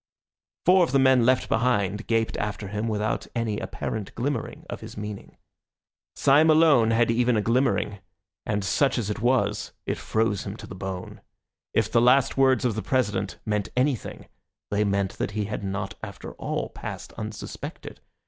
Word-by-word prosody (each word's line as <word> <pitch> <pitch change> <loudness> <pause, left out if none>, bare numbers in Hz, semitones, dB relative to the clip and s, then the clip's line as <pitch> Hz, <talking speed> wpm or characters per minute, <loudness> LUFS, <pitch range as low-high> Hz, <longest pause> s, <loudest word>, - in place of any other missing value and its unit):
Four 185 +1 +6
of 160 - -1
the - - +5
men 130 -3 +5
left 130 0 +3
behind 110 -3 +1
gaped 115 -1 +1
after 105 -1 -3
him 105 +2 -2
without 110 0 -1
any 110 -3 -1
apparent 105 -3 -5
glimmering 140 +5 -3
of - - -6
his - - -10
meaning. 105 -1 -7 0.8
Syme 145 +3 +5
alone 155 -8 +5
had 115 0 +3
even 120 0 +2
a - - +2
glimmering, 115 -4 +1 0.4
and 105 -2 -1
such 135 +8 +2
as 110 -3 -1
it 105 - -4
was 110 -4 +1
it - - -2
froze 110 -3 0
him 100 +1 -6
to - - -9
the - - -9
bone. 95 -1 -6 0.5
If 110 -1 +2
the 115 - +4
last 130 +3 +4
words 130 -3 +3
of 120 - +2
the 110 - -3
President 105 -8 -1
meant 105 -2 -1
anything, 130 -2 -1 0.5
they 105 +1 +2
meant 100 -1 -1
that - - -1
he 105 - 0
had 105 0 -4
not 95 0 -3
after - - -8
all - - -3
passed - - -7
unsuspected. 110 -1 -7
110 Hz, 170 wpm, -26 LUFS, 105-125 Hz, 0.8 s, Four